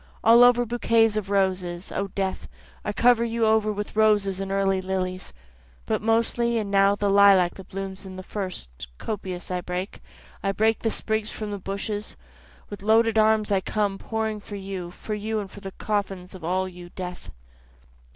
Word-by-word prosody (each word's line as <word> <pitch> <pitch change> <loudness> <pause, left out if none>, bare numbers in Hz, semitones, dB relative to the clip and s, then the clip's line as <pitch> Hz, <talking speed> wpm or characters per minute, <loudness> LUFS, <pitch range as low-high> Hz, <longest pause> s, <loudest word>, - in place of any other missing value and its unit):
All 230 +2 +8
over 245 0 +5
bouquets 230 -2 +2
of 210 -2 -2
roses, 185 -2 0
O 200 - -2
death, 190 0 -3 0.4
I - - -2
cover 235 +2 +4
you 230 -1 0
over 220 -1 +3
with 205 0 -5
roses 205 -3 +3
and 195 0 -4
early 195 -1 +1
lilies, 185 -1 -3 0.5
But - - -1
mostly 230 +1 +2
and 210 -3 -2
now 200 0 +4
the 205 0 -1
lilac 200 -3 +6
that 190 -1 -12
blooms 195 0 -5
the 185 -1 -8
first, 120 - -6
Copious 185 -4 -5
I 180 0 -1
break, 180 +2 -5 0.4
I 195 +1 0
break 220 +2 +2
the 225 - 0
sprigs 220 0 -1
from 215 -1 -5
the 205 - -4
bushes, 205 +2 -4 0.5
With 205 -2 -8
loaded 220 +1 +4
arms 215 -1 +3
I 195 -1 +3
come, 200 -1 -1
pouring 220 -1 -2
for 205 0 -9
you, 190 -3 -5
For 215 +4 -6
you 215 +1 -2
and 205 - -4
the 200 -1 -8
coffins 195 -3 -3
all 185 +1 -1
of 185 - -7
you 175 0 -11
O - - -19
death.) 180 -1 -6
200 Hz, 180 wpm, -25 LUFS, 190-220 Hz, 0.5 s, All